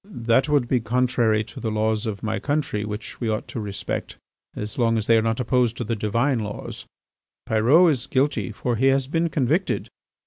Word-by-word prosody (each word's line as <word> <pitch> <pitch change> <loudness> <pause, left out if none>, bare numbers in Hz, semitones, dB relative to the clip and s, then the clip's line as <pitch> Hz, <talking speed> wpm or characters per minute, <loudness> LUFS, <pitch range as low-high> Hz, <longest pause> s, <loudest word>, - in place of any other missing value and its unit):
"That 135 +5 +3
would 145 -5 +2
be 125 0 +2
contrary 120 -2 +1
to 110 - -11
the 115 - -2
laws 110 +1 0
of 100 -2 -5
my 110 0 -1
country 145 -8 -1
which 105 +3 -7
we 115 - 0
ought 110 0 -2
to - - -5
respect 100 -2 -4 0.4
as 105 +4 -6
long 115 -1 +3
as 110 - -1
they 115 - +5
are 110 - +4
not 115 +1 -1
opposed 125 -1 +1
to - - -2
the 115 +1 -2
Divine 115 +5 0
laws. 105 -1 -6 0.6
Pyrot 135 +11 +5
is 130 -4 -3
guilty, 130 -7 0
for 120 +2 -2
he 130 +4 +3
has 135 0 +3
been 165 +4 0
convicted. 155 +5 0
115 Hz, 200 wpm, -23 LUFS, 110-130 Hz, 0.6 s, they